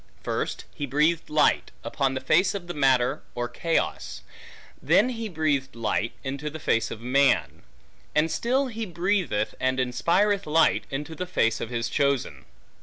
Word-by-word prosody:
First - - -3
he 145 - -4
breathed 155 +5 +1
light, 150 0 +2
upon 135 -2 -1
the 130 - -3
face 185 +5 +3
of 190 -3 -5
the 175 - -5
matter 130 -4 +2
or 120 0 -2
chaos; 165 +7 -2 0.6
then 250 - +4
he 230 -3 -4
breathed 145 -6 -1
light, 115 0 -1
into 140 +2 -4
the 155 - -7
face 115 -7 0
of 110 - -7
man; 135 +3 +2 0.5
and 155 +2 +2
still 260 +4 +1
he 225 -3 -5
breatheth 175 - 0
and 130 0 0
inspireth 180 +11 +1
light, 160 +1 +3
into 145 +4 -5
the 180 +3 -5
face 115 -10 +1
of - - -4
his 120 -1 -2
chosen. 140 -1 -1
150 Hz, 160 wpm, -26 LUFS, 130-175 Hz, 0.6 s, then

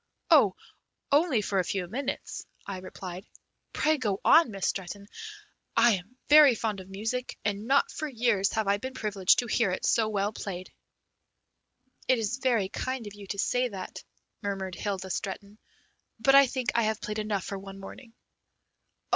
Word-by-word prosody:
"Oh, - - +6 0.6
only 285 -6 +3
for 195 -1 0
a - - +2
few 180 0 -2
minutes," 265 +8 -4 0.2
I 195 -2 -5
replied. 185 0 -8 0.4
"Pray 310 -1 +1
go 205 -5 -1
on, 325 -4 +7
Miss 195 -3 -4
Stretton. 200 +1 -3 0.7
I 235 +1 +6
am 200 +8 -14
very 295 -4 +8
fond 215 -3 -2
of 190 0 -11
music, 225 +6 -3
and 205 +1 -2
not 275 +2 +3
for 310 -2 -4
years 230 -7 +1
have 220 -2 0
I 200 0 +3
been 260 +5 -6
privileged 205 -6 +2
to 245 - +1
hear 230 -2 +1
it 185 - -2
so 220 -1 +2
well 205 0 -1
played." 185 -3 -6 1.4
"It 255 - +4
is 225 +2 -1
very 240 -7 +1
kind 255 +4 -4
of 205 - -8
you 205 -1 -11
to 200 - -4
say 250 +5 +1
that," 190 -3 -7 0.4
murmured 195 -2 -3
Hilda 190 0 -4
Stretton, 200 +3 -5 0.6
"but 270 - +4
I 275 0 +8
think 250 -4 -2
I 235 - +3
have 220 -1 0
played 210 +1 -4
enough 210 -3 -1
for 195 - -5
one 195 0 -10
morning." 225 +4 -11
210 Hz, 170 wpm, -28 LUFS, 195-250 Hz, 1.4 s, very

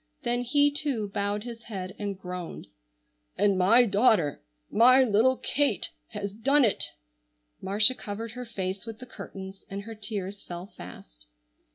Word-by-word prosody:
Then 240 +1 0
he 285 +4 +3
too 275 -8 -1
bowed 205 +1 -1
his 235 -1 -9
head 190 -4 -6
and 200 -2 -3
groaned. 180 -2 -6 0.7
"And 205 -1 +3
my 215 +7 +6
daughter, 205 - +3 0.3
my 255 +4 +6
little 245 +3 +3
Kate 290 0 0 0.2
has 205 -2 -5
done 270 +6 +3
it!" 215 - 0 0.8
Marcia 210 +6 +6
covered 220 -1 -6
her 250 +1 -7
face 195 -1 -4
with 225 -1 -7
the 255 - -10
curtains 195 -5 -9
and 200 +1 -5
her 225 +2 -8
tears 205 -2 -5
fell 175 0 -7
fast. - - -13
210 Hz, 150 wpm, -27 LUFS, 195-240 Hz, 0.8 s, my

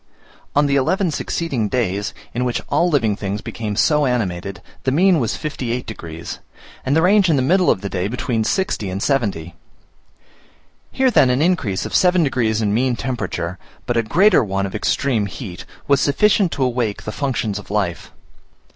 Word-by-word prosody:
On 145 +1 +4
the 140 0 +2
eleven 180 +7 +1
succeeding 135 -9 -2
days, 105 -4 -1 0.2
in 125 - -1
which 125 -1 -1
all 175 - +2
living 115 -10 +2
things 100 0 -3
became 105 -1 -5
so 150 +5 +3
animated, 100 -6 -2 0.2
the 130 - 0
mean 175 +4 +4
was 115 -4 -1
58 125 -5 -3
degs., 85 -7 -7 0.4
and 135 +2 +1
the 160 - +3
range 195 0 +4
in 160 - +4
the 130 - +1
middle 180 +6 +3
of 95 - +2
the 100 - -3
day 95 -1 -2
between 120 0 -1
60 150 - -1
and 95 +2 -3
70 115 - 0
degs. 85 +1 -13 1.4
Here, 260 -1 +2
then, 135 - +5
an 125 +4 +2
increase 150 - 0
of - - -6
seven 180 -1 +4
degrees 115 -6 0
in 105 -1 +1
mean 125 +2 +1
temperature, 110 -8 -4 0.3
but 120 - -1
a 115 - +3
greater 180 - +4
one 100 -1 -1
of 95 - -6
extreme 115 -7 0
heat, 95 -3 -8 0.2
was 140 -1 +3
sufficient 190 +5 +3
to 135 - -1
awake 120 -4 -1
the 110 - -4
functions 115 -6 -2
of 105 - -13
life. 100 -5 -2
125 Hz, 180 wpm, -20 LUFS, 105-145 Hz, 1.4 s, then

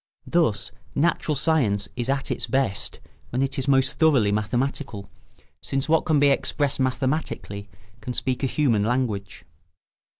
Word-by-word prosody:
Thus 160 -12 +1 0.2
natural 155 0 +1
science 125 -10 +2
is 120 +1 -2
at 135 0 0
its - - -2
best 130 -5 -1 0.3
when 125 +3 0
it 135 0 -2
is 135 - -3
most 135 -1 +2
thoroughly 135 -11 +4
mathematical, 110 -1 -2 0.5
since 135 +2 -2
what 160 0 +3
can 155 -2 +3
be 140 0 +5
expressed 140 0 0
mathematically 130 -6 -2 0.3
can 125 +3 -5
speak 130 -1 -1
a 135 - +1
human 130 -6 +2
language. 110 -4 -2
130 Hz, 140 wpm, -24 LUFS, 110-140 Hz, 0.5 s, be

